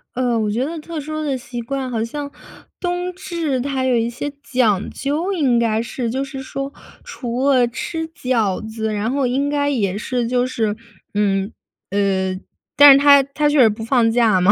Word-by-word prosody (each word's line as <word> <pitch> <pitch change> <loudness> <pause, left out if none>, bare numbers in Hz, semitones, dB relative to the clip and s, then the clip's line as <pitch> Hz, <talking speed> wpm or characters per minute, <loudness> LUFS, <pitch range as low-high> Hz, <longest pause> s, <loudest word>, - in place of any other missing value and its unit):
呃， 245 -2 +1
我 215 -1 0
觉 235 +5 0
得 330 +3 -5
特 320 +1 -6
殊 310 +1 -4
的 275 -3 -1
习 240 -1 -7
惯， 265 +2 -3
好 225 -3 -1
像 285 +4 -5 0.5
冬 355 0 -2
至 335 -7 -2
它 270 0 -2
有 255 -1 +2
一 230 0 +1
些 280 +4 -5
讲 220 -7 +1
究， 305 +8 -2
应 270 -9 +2
该 225 -1 +1
是， 235 0 -4
就 265 +4 -1
是 270 -1 -7
说 275 +1 -5 0.3
除 250 +2 -3
了 255 -3 +4
吃 320 +7 -4
饺 250 - 0
子， 220 0 -3
然 210 +2 -1
后 275 -1 +1
应 275 +3 0
该 285 0 0
也 205 -9 0
是 240 +2 -2
就 250 +1 +1
是 220 -4 -1 0.4
嗯， 200 0 0 0.4
呃 190 -2 0 0.4
但 290 0 +10
是 - - +6
它 280 0 +7
它 300 0 +2
就 295 0 +2
是 235 -4 +7
不 215 +1 -5
放 230 0 +3
假 225 -5 +3
嘛， 185 +3 +6
255 Hz, 205 characters per minute, -20 LUFS, 225-285 Hz, 0.5 s, 但